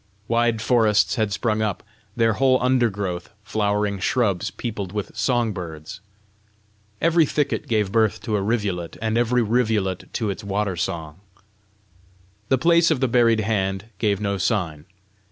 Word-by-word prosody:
Wide 115 -1 +1
forests 110 -4 +3
had 110 -4 0
sprung 110 +1 0
up, 105 -4 -2 0.3
their 115 -1 +3
whole 130 +3 +3
undergrowth 105 -8 0
flowering 105 -1 -1
shrubs 100 -3 0
peopled 100 -6 -5
with 105 -2 -4
song 120 -4 +1
birds. 85 +2 -7 1.0
Every 165 0 +4
thicket 145 -2 -1
gave 105 -4 0
birth 110 -1 +2
to 110 - -1
a 100 - 0
rivulet, 100 -5 -2
and 110 0 -1
every 120 +1 +2
rivulet 110 -5 0
to 110 -4 -1
its 100 +3 -7
water 100 -1 -1
song. 85 -3 -4 1.3
The 130 - +4
place 170 +4 +4
of 155 -5 +1
the 130 - +2
buried 115 -2 +3
hand 100 -1 -1
gave 100 -2 +1
no 100 -2 -2
sign. 85 -7 -1
105 Hz, 145 wpm, -23 LUFS, 95-120 Hz, 1.3 s, Every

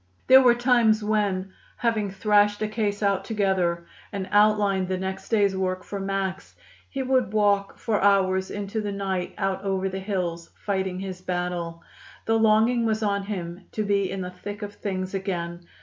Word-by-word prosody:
There 260 +1 +8
were 245 -2 +5
times 240 -3 +3
when, 200 -3 0 0.2
having 220 -4 0
thrashed 205 +1 +2
a - - 0
case 210 -1 -2
out 200 -1 +2
together 190 -5 0 0.3
and 195 -3 -4
outlined 205 -2 +3
the 185 0 -1
next 190 +1 -5
day's 205 -4 +3
work 185 -1 -2
for 200 - -6
Max, 195 0 -3 0.3
he 270 -1 -3
would 255 -4 +1
walk 205 -2 +2
for 220 -3 -1
hours 190 -1 +3
into 205 +2 -3
the 205 -1 -3
night 195 -2 -3
out 195 0 -1
over 195 -1 0
the 190 +1 -4
hills, 180 -4 -3 0.2
fighting 190 -2 -1
his 185 -2 -6
battle. 175 -2 -3 0.4
The 225 0 +2
longing 220 +2 +4
was 220 -1 0
on 200 -1 +1
him 180 -2 -5
to 215 - -1
be 200 -2 +1
in 195 - -4
the 180 0 -5
thick 205 +3 -7
of 205 0 -6
things 190 -2 -4
again. 175 -3 -4
195 Hz, 175 wpm, -25 LUFS, 185-210 Hz, 0.4 s, There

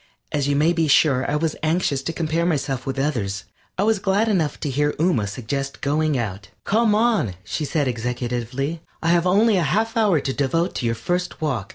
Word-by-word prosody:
As 145 -2 0
you 145 - +1
may 155 +4 +3
be 165 -2 +1
sure 135 -2 +3
I 145 - 0
was 155 0 0
anxious 155 -4 +1
to 150 - -3
compare 165 0 -1
myself 135 -6 -1
with 135 0 -2
others, 110 -9 -1 0.3
I 190 - +1
was 220 -1 +2
glad 200 +3 +1
enough 175 -9 0
to 150 - -2
hear 145 +2 +1
Ooma 155 - +2
suggest 135 +5 -4
going 150 0 +1
out. 100 -4 -4
"Come 220 0 +2
on," 215 - +2
she 150 - -3
said, 150 -1 0
executively, 125 +4 -3 0.2
"I 165 - +2
have 175 +1 +3
only 205 +3 +4
a - - +2
half 220 +8 0
hour 210 -8 +3
to 135 -1 -2
devote 165 +7 0
to 120 - -1
your 115 - 0
first 180 +10 -2
walk. 130 -11 -2
150 Hz, 205 wpm, -22 LUFS, 130-175 Hz, 0.3 s, only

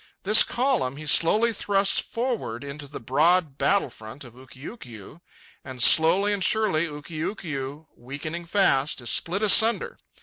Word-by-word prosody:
This 210 +3 +6
column 240 - -1
he 155 - -9
slowly 215 +10 +2
thrusts 200 -1 +1
forward 230 - -5
into 140 +1 -9
the 145 - -9
broad 150 +4 0
battle 200 -10 0
front 110 +7 -12
of 120 -3 -14
Ukiukiu, 130 - -13 0.4
and 130 -2 -3
slowly 190 +6 +4
and 200 -2 -3
surely 190 -6 0
Ukiukiu, 150 -1 -7
weakening 155 +7 -8
fast, 155 -8 +1
is 120 - 0
split 190 +5 -1
asunder. 220 +2 +3
160 Hz, 135 wpm, -24 LUFS, 135-200 Hz, 0.4 s, This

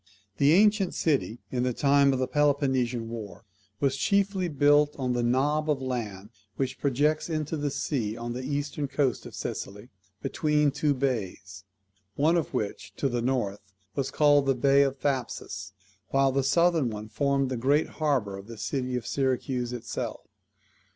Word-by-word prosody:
The 145 +2 +5
ancient 205 0 +4
city, 135 -7 0
in 125 - -1
the 125 0 0
time 140 +1 +4
of 135 - 0
the 130 0 0
Peloponnesian 130 -5 +1
war, 110 -3 -8 0.3
was 135 -2 +1
chiefly 195 +2 +1
built 145 -1 +3
on 130 -2 -1
the 120 - 0
knob 145 +6 +1
of 145 -3 +2
land 110 -6 -4 0.2
which 130 -1 -2
projects 150 +4 +1
into 155 -1 -2
the 145 -1 -1
sea 125 -6 -2
on 120 0 -4
the 125 - -4
eastern 145 +1 -2
coast 140 -2 -1
of - - -11
Sicily, - - -6 0.3
between 150 -1 +1
two 145 +1 +1
bays; 100 -8 -3 0.5
one 155 +4 +3
of 165 -4 0
which, 105 -2 -4
to 140 - 0
the 120 -1 -1
north, 120 -5 -1 0.3
was 135 -2 -2
called 145 -2 +4
the 135 - +3
bay 140 +2 +4
of 135 -1 +1
Thapsus, 135 -3 -3 0.4
while 135 0 +3
the 135 +1 +1
southern 165 0 +3
one 105 -1 -6
formed 140 +3 0
the 130 - -2
great 140 +6 +2
harbour 125 -10 0
of 95 - -12
the 115 -1 -9
city 130 +3 -2
of 120 -2 -3
Syracuse 130 -2 -1
itself. 120 -3 -5
135 Hz, 165 wpm, -27 LUFS, 120-145 Hz, 0.5 s, The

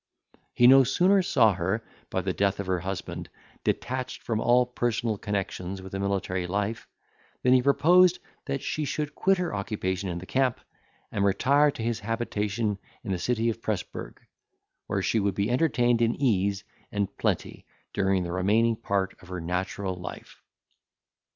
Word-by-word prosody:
He 120 - +5
no 135 +2 +9
sooner 180 +9 +3
saw 115 - +4
her, 95 +5 -1 0.3
by 95 - -1
the 95 0 -2
death 100 +1 0
of 100 - -2
her 90 -1 0
husband, 95 +1 -5 0.3
detached 130 0 -2
from 115 -2 -1
all 125 +1 +4
personal 120 -2 -1
connexions 95 -2 -3
with 95 0 -10
a 95 - -2
military 95 -2 -1
life, 100 +4 -2 0.6
than 125 - +5
he 130 - +5
proposed 175 +7 +5 0.3
that 140 -2 -3
she 155 - -2
should 150 +1 -3
quit 195 0 +2
her 180 -2 -2
occupation 100 -2 -2
in 85 - -3
the 90 - -7
camp, 130 +2 +1 0.5
and 100 - 0
retire 140 +9 +4
to 115 - -5
his 115 -1 -1
habitation 105 -2 -2 0.2
in - - -4
the 90 - -1
city 115 +2 0
of 115 - -9
Presburg, 95 - -4 0.7
where - - -1
she 115 - +2
would 100 -2 0
be 100 +4 0
entertained 120 -4 +2
in 115 0 +2
ease 100 -6 +1 0.3
and 100 -1 -2
plenty - - -2 0.3
during 95 -1 +1
the 85 - -4
remaining 110 +5 +2
part 100 -4 -1
of 90 - -15
her 90 0 -5
natural 90 +3 -2
life. 90 0 -9
105 Hz, 165 wpm, -27 LUFS, 95-125 Hz, 0.7 s, no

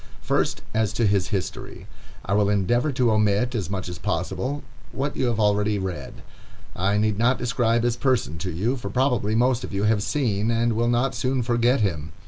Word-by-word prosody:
First, - - 0
as 110 -2 +1
to 115 - +1
his 100 -2 +2
history. 95 -1 -4 0.4
I 95 - -1
will 100 0 +3
endeavor 120 +8 +1
to 125 -3 +2
omit, 105 +3 +2
as 100 -8 -2
much 95 -2 -3
as 90 - -7
possible, 105 +10 -2 0.3
what 140 +2 -3
you 130 - 0
have 115 -2 -1
already 105 0 +2
read. 90 -9 -6 0.5
I 100 +3 +1
need 105 -1 +1
not 125 +3 +3
describe 120 -2 +1
his 120 0 0
person 120 - 0
to 95 - -3
you, 110 +11 -1
for 120 - -6
probably 125 -5 +1
most 125 +1 +2
of - - -6
you 100 +1 -1
have 105 -1 +2
seen 110 -5 0
and 115 0 +1
will 120 +2 +1
not 120 +3 +1
soon 130 -1 -1
forget 120 +2 +2
him. 80 -6 -2
110 Hz, 195 wpm, -24 LUFS, 100-120 Hz, 0.5 s, will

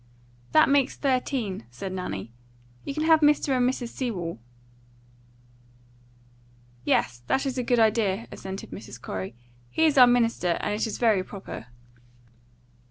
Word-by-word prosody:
"That - - +6
makes 275 -1 +2
thirteen," 250 - -1
said 185 +11 -6
Nanny. 115 - -5 0.5
"You 275 - -4
can 310 - -1
have 320 0 +6
Mr. 295 -2 +3
and 250 0 +3
Mrs. 250 -2 -4
Sewell." 185 - -4 2.4
"Yes, 120 -1 +1
that 270 - +1
is 265 -1 -2
a - - 0
good 245 0 +2
idea," 220 -1 +2
assented 190 0 -7
Mrs. 125 - -9
Corey. 95 -1 -5 0.3
"He 320 - +2
is 295 -4 +4
our 250 - +10
minister, 230 -8 +2
and 205 - -2
it 215 +2 -1
is 220 - -4
very 220 -6 +3
proper." 190 - -9
230 Hz, 140 wpm, -26 LUFS, 185-260 Hz, 2.4 s, our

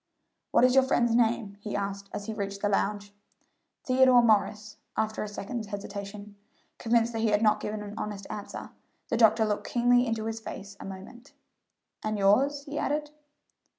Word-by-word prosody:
"What - - +4
is 255 0 +5
your 265 0 +6
friend's 240 -3 +2
name?" 225 -3 +1
he 210 0 -5
asked 200 0 -4
as 205 - -5
he 220 - -4
reached 200 -1 -5
the 205 - +2
lounge. 205 0 -1 0.7
"Theodore 255 -1 +5
Morris," 210 -1 +1 0.2
after 220 0 -1
a 215 - -3
second's 210 +2 -5
hesitation. 200 0 -7 0.4
Convinced 235 0 +2
that 225 - -2
he 225 - +2
had 210 +1 +2
not 210 -1 +4
given 210 0 -4
an 205 0 -8
honest 205 -2 -5
answer, 205 -1 -7 0.4
the 230 - +1
doctor 220 -1 +5
looked 210 -1 -2
keenly 245 +1 +4
into 225 -1 -2
his 225 0 -3
face 200 -2 -8
a - - -8
moment; 195 +7 -10 0.7
"and 215 0 -1
yours?" 270 +9 +3
he 290 +1 -5
added. 295 +1 -1
215 Hz, 175 wpm, -28 LUFS, 205-240 Hz, 0.7 s, your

